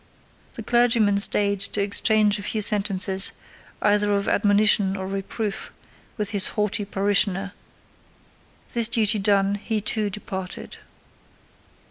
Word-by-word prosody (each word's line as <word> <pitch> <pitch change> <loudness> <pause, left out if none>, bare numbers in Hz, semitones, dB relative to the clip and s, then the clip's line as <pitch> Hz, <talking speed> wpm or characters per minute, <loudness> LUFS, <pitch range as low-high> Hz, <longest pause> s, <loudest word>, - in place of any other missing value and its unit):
The 230 - -8
clergyman 230 -3 +2
stayed 200 -1 +4
to 200 +1 -5
exchange 210 +1 +1
a - - -7
few 215 +2 -1
sentences, 195 -2 +2 0.5
either 205 0 +2
of 200 0 -2
admonition 205 -1 +2
or 190 - -6
reproof, 195 +2 -5 0.5
with 210 -1 -2
his 200 -2 +2
haughty 210 0 -1
parishioner; 195 0 0 1.2
this 235 -2 +2
duty 220 -2 +2
done, 200 0 +1
he 220 -2 -2
too 210 0 -2
departed. 190 -2 -7
205 Hz, 115 wpm, -22 LUFS, 195-215 Hz, 1.2 s, stayed